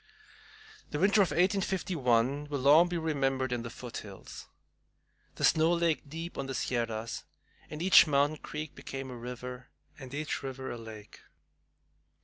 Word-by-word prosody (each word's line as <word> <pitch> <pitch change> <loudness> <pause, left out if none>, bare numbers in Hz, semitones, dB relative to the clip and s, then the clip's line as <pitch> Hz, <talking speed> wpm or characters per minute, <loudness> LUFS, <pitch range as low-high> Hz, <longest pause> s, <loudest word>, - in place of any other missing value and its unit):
The 150 - -3
winter 200 +5 +4
of 190 - +3
1851 160 - +1
will 145 - -1
long 150 +6 +6
be 175 - -1
remembered 135 -5 0
in 120 -1 -1
the 115 - -6
foothills. 110 -5 -9 0.9
The - - -6
snow 160 +1 +4
lay 170 -1 +3
deep 165 +4 -8
on 135 - -3
the 135 - -4
Sierras, 115 -2 -2 0.4
and 155 +2 -5
every 185 -4 +7
mountain 145 +2 +2
creek 150 0 -6
became 135 -1 -7
a - - -7
river, 125 +1 -7 0.3
and 130 -2 -9
every 155 +1 -3 0.2
river 130 0 -6
a 120 - -5
lake. 110 -2 -11
140 Hz, 145 wpm, -30 LUFS, 125-160 Hz, 0.9 s, every